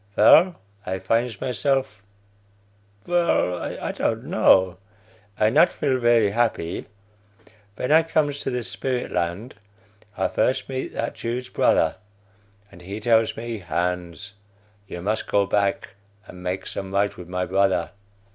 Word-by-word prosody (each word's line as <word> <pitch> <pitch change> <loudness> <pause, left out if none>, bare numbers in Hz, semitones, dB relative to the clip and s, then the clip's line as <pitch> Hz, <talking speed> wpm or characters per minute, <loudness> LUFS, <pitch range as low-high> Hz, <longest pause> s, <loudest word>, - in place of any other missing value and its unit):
Vell, 175 +2 +6 0.3
I 95 +1 -3
finds 115 +2 -1
myself 135 -3 -1 1.0
vell, 170 - +1
I - - -4
don't - - -2
know; 95 -2 +3 0.6
I 110 0 +3
not 155 +7 +5
feel 130 -3 0
very 120 -4 +3
happy. 110 -7 -1 0.9
Ven 125 - -2
I 160 +1 +7
comes 150 -3 0
to - - -3
the 125 -2 -2
spirit 125 +1 -3
land, 85 +8 -2 0.6
I - - +1
first 130 +1 0
meet 130 0 -4
that 115 - -2
Jew's 125 +2 -4
brother, - - +2 0.7
and 85 - -15
he 100 +4 -6
tells 115 0 +2
me, 115 -1 -5
'Hans, 90 +2 -3 0.5
you 85 -1 -7
mus 110 +3 0
go 100 -1 +1
back 100 -1 -1 0.3
and 90 - -12
makes 90 +1 -4
some 95 -1 -5
right 100 +1 +1
with 90 - -10
my 90 0 -2
brother.' 95 +1 +1
110 Hz, 135 wpm, -23 LUFS, 95-130 Hz, 1.0 s, I